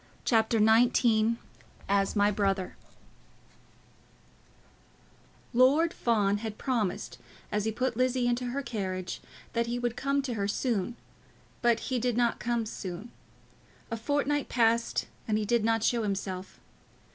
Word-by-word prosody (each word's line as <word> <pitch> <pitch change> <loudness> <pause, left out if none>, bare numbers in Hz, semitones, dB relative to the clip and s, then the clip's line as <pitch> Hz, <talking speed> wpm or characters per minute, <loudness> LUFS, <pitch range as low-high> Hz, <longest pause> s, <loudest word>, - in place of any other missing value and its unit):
CHAPTER 225 -1 +3
XIX 225 0 +4 0.5
"As 195 +1 +1
My 205 0 +4
Brother" 195 -2 -1 2.8
Lord 280 +7 +4
Fawn 205 -4 +1
had 220 -1 -5
promised, 230 -8 -2 0.3
as 210 0 0
he 220 - +1
put 250 +2 -1
Lizzie 255 0 +1
into 245 +1 0
her 265 +3 -3
carriage, 185 -6 -4 0.3
that 235 0 0
he 240 +1 -1
would 240 -1 -1
come 275 +1 0
to 255 -3 -3
her 200 -3 -1
soon, 230 0 -1 0.7
but 235 -2 +3
he 255 -2 -1
did 245 -1 0
not 240 -1 +2
come 235 -1 -1
soon. 200 +1 -6 0.8
A - - 0
fortnight 285 +4 0
passed 230 -1 +2 0.2
and 215 -1 +1
he 215 - -1
did 235 0 +2
not 225 0 +2
show 235 0 +2
himself. 190 -2 -4
230 Hz, 135 wpm, -29 LUFS, 210-245 Hz, 2.8 s, XIX